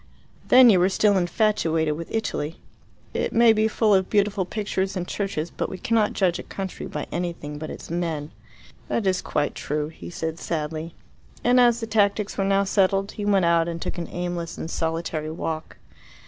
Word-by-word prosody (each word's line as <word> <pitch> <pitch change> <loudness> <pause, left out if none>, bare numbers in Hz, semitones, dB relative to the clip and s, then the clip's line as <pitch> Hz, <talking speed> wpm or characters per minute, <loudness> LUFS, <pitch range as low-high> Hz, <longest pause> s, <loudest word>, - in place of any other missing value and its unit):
Then 250 -2 +8
you 185 - +4
were 180 +2 +4
still 205 +1 +3
infatuated 175 -5 +1
with 165 +1 -7
Italy. 165 -8 -2 0.5
It - - -1
may 230 0 +6
be 215 0 +2
full 220 -1 +2
of 190 -1 +2
beautiful 205 -2 +1
pictures 195 -1 -2
and 180 -1 -3
churches, 190 -5 -3
but - - -3
we 190 - -6
cannot 220 +1 +1
judge 180 -3 +1
a - - -3
country 190 -1 -6
by - - -4
anything 170 -4 -4
but 155 - -6
its - - -8
men." 165 -3 -2 0.6
"That 225 - -1
is 185 -1 +1
quite 145 - -1
true," 150 +1 -3
he 160 - -10
said 160 -1 -4
sadly. 160 0 -4 0.5
And 250 +1 +5
as 240 -1 +4
the - - -2
tactics 210 -1 +1
were 195 - 0
now 195 0 +3
settled, 195 0 +2
he 205 - -5
went 195 -3 +3
out 170 0 +3
and 170 -1 -4
took 175 - -4
an 170 - -5
aimless 175 -1 -4
and 165 - -5
solitary 165 -1 -2
walk. 160 0 -5
185 Hz, 190 wpm, -24 LUFS, 165-205 Hz, 0.6 s, Then